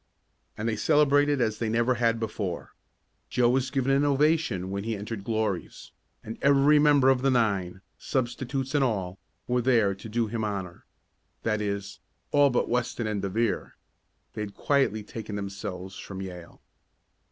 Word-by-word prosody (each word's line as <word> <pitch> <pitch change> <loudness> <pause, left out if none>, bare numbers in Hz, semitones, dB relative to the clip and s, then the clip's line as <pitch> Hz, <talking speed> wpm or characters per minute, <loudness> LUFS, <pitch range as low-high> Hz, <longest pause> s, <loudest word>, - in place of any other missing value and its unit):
And 105 - -2
they 115 - 0
celebrated 145 0 +3
as 110 -2 0
they 115 - -1
never 120 +3 +2
had 115 -2 +1
before. 105 -5 -4 0.6
Joe 120 -1 +3
was 130 0 +1
given 135 0 0
an 135 +1 +3
ovation 145 - +1
when 100 0 -3
he 115 0 -2
entered 105 0 -6
Glory's, 110 -4 -3 0.3
and 110 - -7
every 140 +2 +5
member 145 -3 +5
of 130 -2 +3
the 135 - +2
nine 100 -7 0 0.2
substitutes 130 +1 -2
and 145 -2 +3
all 95 -7 -2 0.3
were 125 0 +1
there 115 -5 +3
to 100 +3 -10
do 115 +2 0
him 110 +1 -3
honor. 100 -4 -4 0.6
That 110 -1 0
is, 100 -1 -4 0.3
all 145 -1 +5
but 125 - +1
Weston 120 -1 -1
and 105 -2 -2
De 100 - -2
Vere. 115 +2 -1 0.6
They - - -5
had 100 -1 -6
quietly 135 -7 +1
taken 110 0 -7
themselves 95 -2 -6
from 95 -1 -8
Yale. 90 -3 -9
115 Hz, 165 wpm, -27 LUFS, 100-135 Hz, 0.6 s, every